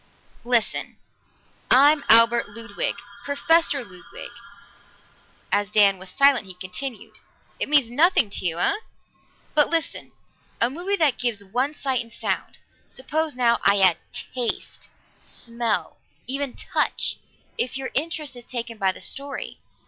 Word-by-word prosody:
"Listen! 240 -2 0 0.7
I'm 285 +3 +5
Albert 230 +1 +6
Ludwig 230 +3 -3 0.3
Professor 285 -1 +2
Ludwig." 180 +5 -11 1.2
As 205 0 +1
Dan 200 -2 +4
was 190 0 -9
silent, 275 -1 +3
he 185 - -8
continued, 195 +7 -7 0.4
"It - - -2
means 290 -5 +5
nothing 260 - +3
to - - -2
you, 170 -2 0
eh? 400 - +2 0.8
But 295 -2 +4
listen 330 -1 -1 0.5
a 235 +2 +2
movie 360 +7 -2
that 310 -8 +2
gives 235 -5 -1
one 255 +9 -1
sight 265 -4 -1
and 230 0 -12
sound. - - -4 0.3
Suppose 305 +2 -2
now 235 -2 +2
I 200 +1 +4
add 185 -3 +5
taste, 245 -3 -2 0.3
smell, 235 -2 -3 0.3
even 275 0 -3
touch, - - 0 0.4
if 255 +2 -1
your 270 -1 -5
interest 305 -1 -2
is 240 -1 -12
taken 235 -3 -5
by 190 -2 +2
the - - -10
story. 275 0 -3
245 Hz, 135 wpm, -23 LUFS, 215-285 Hz, 1.2 s, Albert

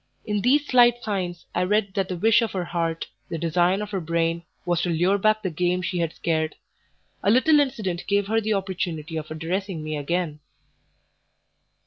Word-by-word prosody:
In 210 -2 -1
these 285 +6 +3
slight 240 -2 +4
signs 180 -5 -3
I 180 - 0
read 200 +1 +1
that 195 -2 -1
the 180 - -3
wish 225 +5 +4
of 230 - -2
her 185 -2 -2
heart, 165 -1 -2 0.2
the 165 - -3
design 175 +4 +1
of 210 - -8
her 195 -3 -2
brain, 165 0 0 0.2
was 175 -1 +1
to 175 - -1
lure 175 +4 +2
back 215 +2 +2
the 185 - -1
game 180 +2 0
she 180 0 -2
had 165 -2 0
scared. 160 -2 -1 0.7
A 200 - +2
little 295 +7 +5
incident 215 -11 -1
gave 200 0 +2
her 225 +2 +1
the 215 0 0
opportunity 175 -5 -3
of 155 -1 -4
addressing 165 +2 -3
me 155 0 -3
again. 155 +1 -2
180 Hz, 185 wpm, -24 LUFS, 165-210 Hz, 0.7 s, little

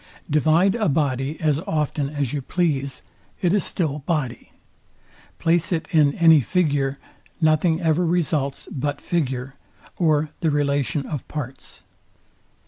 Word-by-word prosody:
Divide 160 +5 +3
a 220 -6 0
body 140 0 -1
as 150 -3 +1
often 150 -2 -1
as 145 -4 -2
you 145 - -2
please, 140 -3 -1 0.4
it 180 -1 +1
is 205 -4 +2
still 150 -5 -1
body. 140 -5 -3 0.9
Place 170 +1 +1
it 160 -2 -1
in 150 -4 +4
any 160 -3 +6
figure, 140 -3 0 0.4
nothing 160 +1 +3
ever 165 0 +2
results 155 -5 0
but 145 +1 -2
figure, 135 -6 -2 0.4
or 155 -3 +2
the 160 - +1
relation 145 -1 0
of 145 -5 -5
parts. 135 -3 -7
150 Hz, 130 wpm, -23 LUFS, 140-165 Hz, 0.9 s, any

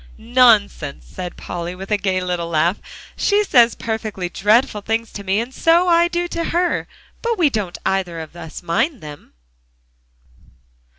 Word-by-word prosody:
"Nonsense!" 220 - +2
said 180 -1 -7
Polly, 175 +1 -5
with 195 +3 -9
a 210 - +3
gay 190 -2 -1
little 180 -2 -2
laugh. 170 +4 +1 0.4
"She 415 0 +2
says 240 - +4
perfectly 215 -5 -4
dreadful 210 +3 +2
things 225 +2 -2
to 200 - -7
me, 195 +2 +1
and 240 +3 -4
so 335 +5 +3
I 340 0 +5
do 345 0 -2
to 335 -1 -3
her, 350 +1 0 0.3
but 465 -1 -1
we 320 -6 +3
don't 205 -7 -3
either 190 -3 -1
of 160 +1 -9
us 165 0 -9
mind 230 - 0
them." 150 -1 -11
210 Hz, 160 wpm, -20 LUFS, 180-265 Hz, 0.4 s, I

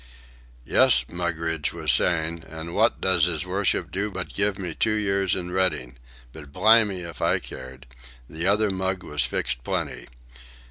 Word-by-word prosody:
"Yes," - - +5
Mugridge 80 -3 -2
was - - +1
saying, 85 -1 +1
"an' 80 +1 -8
wot - - +2
does 90 -3 +3
'is 80 -2 -2
worship 95 +2 0
do 100 +3 -2
but 95 -2 -7
give 100 -1 0
me 90 -4 -5
two 110 +7 0
years 100 -3 0
in 90 -1 -5
Reading. 90 -9 -1 0.4
But 75 -3 -12
blimey 110 0 +4
if 85 -2 -9
I - - +2
cared. 65 +1 -10 0.4
The 80 +6 -3
other 105 +1 +2
mug 95 0 -2
was 75 0 +1
fixed - - -3
plenty. - - -3
90 Hz, 155 wpm, -24 LUFS, 80-95 Hz, 0.4 s, Yes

